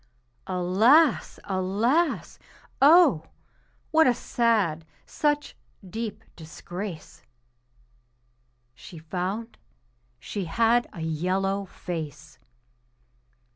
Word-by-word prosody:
Alas! 215 - +3
alas! 210 - 0 0.4
Oh! 285 - +6 0.6
what 320 -1 +5
a 245 - +3
sad, 210 -12 0 0.2
such 295 -1 -1 0.3
deep 220 +2 -6
disgrace! 175 +2 -8 1.5
She 165 +7 -13
found 185 +8 -5 0.6
she 195 - -5
had 230 +7 +2
a 170 - -9
yellow 185 +5 -1
face. 155 -4 -7
195 Hz, 70 wpm, -26 LUFS, 170-235 Hz, 1.5 s, Oh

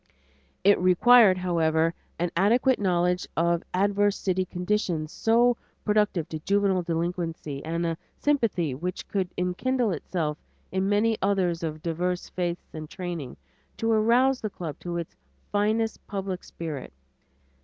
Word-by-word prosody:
It 200 +1 +5
required, 190 +3 +6
however, 165 -2 +1 0.2
an 175 0 -1
adequate 240 +8 +3
knowledge 180 -2 +1
of 170 0 +2
adverse 205 +2 +2
city 185 -1 0
conditions 180 -4 -1
so 235 +1 +3 0.3
productive 210 -6 +2
of 155 -1 -5
juvenile 200 -2 +2
delinquency 165 -4 -3
and 165 +2 -2
a 165 -1 -2 0.2
sympathy 225 - +1
which 180 +7 -5
could 190 -3 -2
enkindle 220 +6 0
itself 160 -2 -2 0.3
in 190 +1 0
many 215 +2 +2
others 185 -4 +1
of 155 -2 -4
divers 175 +2 -2
faiths 175 -1 -4
and 155 -1 -7
training, 175 -9 -5 0.4
to 225 0 0
arouse 240 +4 +3
the 215 - -2
club 165 -6 -7
to 175 -1 -4
its 170 -1 -6 0.4
finest 215 +2 0
public 195 -3 -4
spirit. 155 -5 -6
180 Hz, 135 wpm, -26 LUFS, 170-205 Hz, 0.4 s, required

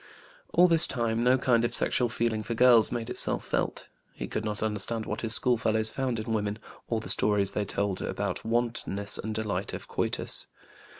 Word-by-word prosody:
All 180 - +5
this 165 -1 +7
time, 115 -2 -2
no 125 +1 +4
kind 120 -3 +1
of 120 - +2
sexual 120 -1 0
feeling 115 -1 -1
for 115 +2 -5
girls 120 -2 +5
made 120 -2 -4
itself - - +1
felt. - - -2 0.3
He - - -5
could 110 - -4
not 105 -1 -3
understand 110 +1 -2
what 105 - -5
his 115 -1 +2
schoolfellows 110 -3 +1
found 130 -4 -2
in 110 +1 -4
women, 105 -1 -2 0.3
or 115 - -1
the 110 - -9
stories 100 -2 +3
they 105 - -2
told 100 -1 -3
about - - -4
wantonness 115 -3 -1
and 110 0 -5
delight 110 -1 -3
of - - -7
coitus. - - +1
115 Hz, 185 wpm, -27 LUFS, 105-120 Hz, 0.3 s, this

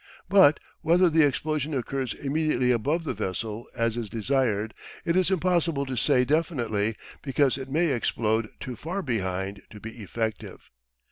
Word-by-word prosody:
But 185 -5 +6 0.2
whether 175 +1 +4
the 160 +1 +5
explosion 150 +1 0
occurs 130 0 -2
immediately 140 -3 +1
above 145 +8 +1
the 155 - -2
vessel 110 +2 -4
as 115 -1 0
is 115 -3 -3
desired, 110 -2 0 0.3
it 170 - +1
is 185 -1 +3
impossible 170 -5 +1
to 130 -1 -4
say 125 0 +3
definitely, 120 - 0 0.3
because 135 -1 +2
it 135 0 -6
may 165 +4 +2
explode 110 -3 0
too 130 -2 -6
far 180 - -4
behind 95 -5 -2
to 105 - -11
be 115 +2 -9
effective. 110 +2 -5
130 Hz, 150 wpm, -26 LUFS, 110-155 Hz, 0.3 s, But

